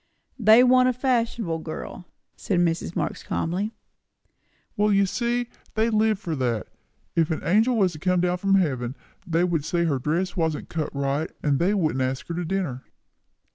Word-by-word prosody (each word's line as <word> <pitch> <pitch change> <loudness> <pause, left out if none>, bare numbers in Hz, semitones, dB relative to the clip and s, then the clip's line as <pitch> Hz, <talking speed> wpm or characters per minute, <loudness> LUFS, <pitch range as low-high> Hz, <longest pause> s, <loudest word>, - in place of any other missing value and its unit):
"They 220 +2 +7
want 255 0 +5
a - - +1
fashionable 235 -9 0
girl," 160 +2 -7 0.3
said 185 -4 -1
Mrs. 170 0 0
Marx - - -2
calmly. 185 +6 -2 1.0
"Well, 210 +1 +2
you 200 0 +4
see," 240 +5 -1
said 240 - -19
Tom, - - -28 0.2
"they 220 +1 +2
live 215 -1 +2
for 175 -6 -4
that. 120 -5 -1 0.5
If 165 -2 +2
an 160 - -2
angel 220 +8 +3
was 190 -4 +2
to 155 - -9
come 180 +1 +1
down 180 0 0
from 195 +1 +2
heaven, 130 -9 0 0.3
they 165 0 +2
would 170 -4 0
say 170 +2 0
her 145 -5 0
dress 170 +8 -1
wasn't 160 -4 -1
cut 155 -2 -2
right, 140 +3 -1
and 145 -2 +2
they 190 +5 +2
wouldn't 155 -8 0
ask 130 +1 -2
her - - -2
to 175 +1 -2
dinner!" 160 -8 -2
175 Hz, 185 wpm, -25 LUFS, 155-210 Hz, 1.0 s, They